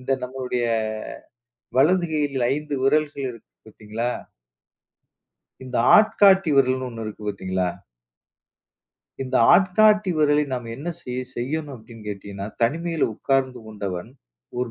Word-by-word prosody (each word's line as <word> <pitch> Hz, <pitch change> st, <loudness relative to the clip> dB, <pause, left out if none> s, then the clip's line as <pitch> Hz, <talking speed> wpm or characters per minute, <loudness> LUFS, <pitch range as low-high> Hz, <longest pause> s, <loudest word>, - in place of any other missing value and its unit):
இந்த 130 Hz, +1 st, -1 dB
நம்முடைய 125 Hz, -1 st, -3 dB, 1.1 s
வலது 175 Hz, +5 st, +4 dB
கையில் 140 Hz, -5 st, 0 dB
5 150 Hz, 0 st, -3 dB
விரல்கள் 145 Hz, 0 st, +1 dB
இருக்கு 115 Hz, -2 st, -14 dB, 0.2 s
பார்த்தீங்களா? 110 Hz, +3 st, -4 dB, 1.5 s
இந்த 125 Hz, -1 st, -4 dB, 0.2 s
ஆட்காட்டி 200 Hz, -5 st, +5 dB
விரல்ன்னு 130 Hz, -1 st, +2 dB
1 115 Hz, -2 st, -7 dB
இருக்கு, 110 Hz, 0 st, -8 dB
பார்த்தீங்களா? 95 Hz, -2 st, -2 dB, 1.5 s
இந்த 130 Hz, -, -1 dB, 0.2 s
ஆட்காட்டி 205 Hz, +2 st, +4 dB
விரலை 150 Hz, 0 st, +3 dB
நாம் 125 Hz, -2 st, -3 dB
என்ன 155 Hz, +6 st, -6 dB
செய 125 Hz, 0 st, -4 dB
செய்யணும் 145 Hz, +4 st, -3 dB
அப்பிடின்னு 115 Hz, -2 st, -13 dB
கேட்டீங்கன்னா, 100 Hz, -1 st, -6 dB, 0.2 s
தனிமையில 165 Hz, +6 st, +1 dB
உட்கார்ந்து 130 Hz, -1 st, 0 dB
கொண்டவன் 100 Hz, -2 st, -5 dB, 0.5 s
ஒரு 125 Hz, -1 st, -2 dB
130 Hz, 110 wpm, -23 LUFS, 115-155 Hz, 1.5 s, ஆட்காட்டி